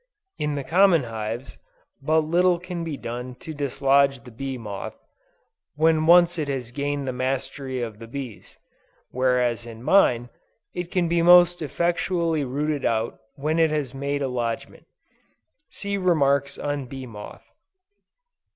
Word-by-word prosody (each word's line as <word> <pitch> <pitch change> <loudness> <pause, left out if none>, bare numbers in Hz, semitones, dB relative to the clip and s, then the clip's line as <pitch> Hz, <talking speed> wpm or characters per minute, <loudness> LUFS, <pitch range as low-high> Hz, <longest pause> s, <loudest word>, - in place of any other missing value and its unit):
In 150 -1 -1
the 140 - -3
common 175 -1 +4
hives, 115 +2 -5 0.4
but 155 +3 +3
little 175 +3 +3
can 175 -1 -5
be 160 -4 -4
done 125 +1 -6
to 160 +5 -8
dislodge 140 -2 +2
the 125 - -12
bee 135 +3 -5
moth, 105 -4 -7 0.8
when 160 +1 +3
once 175 0 +6
it 150 - -1
has 130 -4 -3
gained 140 +1 -2
the 130 - -1
mastery 130 0 -3
of 110 -3 -6
the 115 - -9
bees; 125 -4 -8 0.5
whereas 125 -3 +1
in 115 0 -10
mine, 125 -7 +4 0.4
it 175 -1 -4
can 180 -2 +1
be 170 0 +2
most 175 0 +6
effectually 170 0 0
rooted 145 +2 -2
out 115 0 -1 0.2
when 155 +3 -1
it 160 -1 +4
has 150 -4 -2
made 140 +1 -2
a - - 0
lodgment. 120 -3 -4 0.8
(See 200 0 -3
Remarks 140 -6 +2
on 145 -2 -3
Bee 130 +1 -7
Moth.) 105 -4 -10
140 Hz, 145 wpm, -24 LUFS, 125-165 Hz, 0.8 s, once